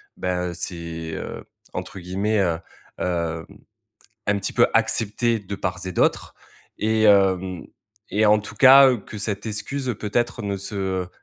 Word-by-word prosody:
ben, 90 -1 -2
c'est, 85 -2 -5
heu, - - -6 0.3
entre 95 - -6
guillemets, 100 +4 -1
heu, 85 -4 +1 0.4
hem, 85 -2 -2 0.8
un 100 0 +2
petit - - -3
peu - - +5
accepté 115 +2 +1
de 100 -1 -7
part, 90 -2 -3
et 90 - -4
d'autre - - 0 0.4
et 110 0 +1
hem 95 -3 +3 0.5
et 105 +1 +3
en 105 0 +5
tout 105 - -10
cas, 135 +1 +9
heu, 125 - +1
que 105 +1 -10
cette 100 +1 -3
excuse 125 +4 -2
peut-être 115 +2 -1
ne 100 -1 -2
se, 100 +2 -7
heu 95 -2 -2
100 Hz, 155 wpm, -23 LUFS, 90-110 Hz, 0.8 s, cas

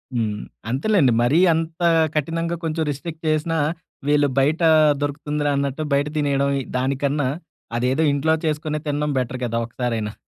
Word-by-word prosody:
హ్మ్. 105 -3 -1 0.3
అంతేలెండి. 140 - +2
మరీ 140 +8 +3
అంత 165 +1 -3 0.3
కఠినంగా 165 +3 -1
కొంచెం 160 0 -1
రిస్ట్రిక్ట్ 160 +3 -7
చేసినా 155 +1 0 0.5
వీళ్ళు 145 -1 +4
బయట 150 +5 +1 0.4
దొరుకుతుందిరా! 145 0 -2
అన్నట్టు 140 +2 -2
బయట 140 +1 +2
తినేయడం. 140 -1 +1
ఈ - - -6
దానికన్నా 140 +1 0 0.5
అదేదో 130 +6 +1
ఇంట్లో 155 +3 +2
చేసుకొని 150 0 -1
తినడం 145 0 -1
బెటర్ 125 0 -3
కదా! 115 0 -1
ఒకసారైనా. 115 -3 -3
145 Hz, 135 wpm, -22 LUFS, 130-155 Hz, 0.5 s, వీళ్ళు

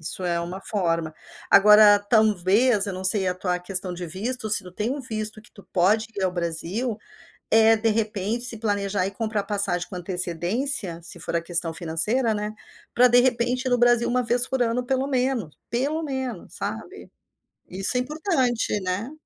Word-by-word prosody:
Isso 175 +3 -1
é 170 -1 -1
uma 180 +3 -6
forma. 165 -6 -2 0.3
Agora, 210 +1 +7
talvez, 210 +1 +2
eu 200 - -3
não 185 +1 -7
sei 190 0 +3
a 180 - -1
tua 180 -1 -1
questão 185 0 -1
de 175 0 -6
visto, 215 +7 -4
se 205 -2 +2
tu 180 - -12
tem 210 +5 -3
um 280 +2 -3
visto 215 -4 -5
que 215 - -21
tu 200 - -15
pode 205 +5 +2
ir 195 - -1
ao 185 - 0
Brasil, 180 +7 -3 0.5
eh, 225 0 +5
de 225 +1 0
repente, 215 +1 -2
se 235 -2 -4
planejar 200 -3 -1
e 195 - -5
comprar 215 -1 -3
passagem 200 -4 -2
com - - -8
antecedência, 180 - -2
se 170 - -7
for - - -5
a 170 - +1
questão 170 -1 0
financeira, 210 +9 +3
né, 210 0 -4 0.4
para 250 +1 +5
de 245 +1 +5
repente 245 0 0
ir - - 0
no 245 - +2
Brasil 240 -1 +3
1 250 0 0
vez 245 +1 0
por 265 -1 -2
ano, 240 +1 0
pelo 265 +1 0
menos, 250 - -2
pelo 280 +8 -1
menos, 265 - -5
sabe, 225 - -7 0.6
isso 195 +6 +3
é - - +2
importante, 255 - -1
né. 190 +9 -4
210 Hz, 185 wpm, -24 LUFS, 185-245 Hz, 0.6 s, Agora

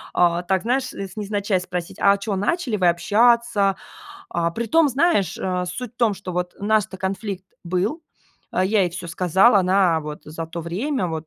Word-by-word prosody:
а, 175 -1 +3
так, 185 +1 0
знаешь, 255 +3 0
из 195 -2 -7
невзначай 205 -2 -1
спросить: 180 -1 -5
"А 200 0 +4
чё, 200 0 -3
начали 235 - -1
вы 180 -3 +3
общаться?". 215 +2 +3 0.5
А, 170 0 -1
притом, 235 - +2
знаешь, 275 - +1
э, 180 -1 -1
суть 235 +7 -6
в - - -57
том, 230 -4 +2
что 190 -1 -7
вот 180 0 -3
у 200 - -7
нас-то 210 -2 +1
конфликт 190 0 -4 0.2
был, 185 - -1 0.5
я 195 +3 +2
ей 180 - 0
всё 175 +1 -7
сказала. 190 +6 +4
Она 185 -3 +3
вот 150 -1 -7
за 160 +2 -6
то 170 +1 -6
время, 195 - -2
вот 160 -1 -5
195 Hz, 180 wpm, -22 LUFS, 180-220 Hz, 0.5 s, А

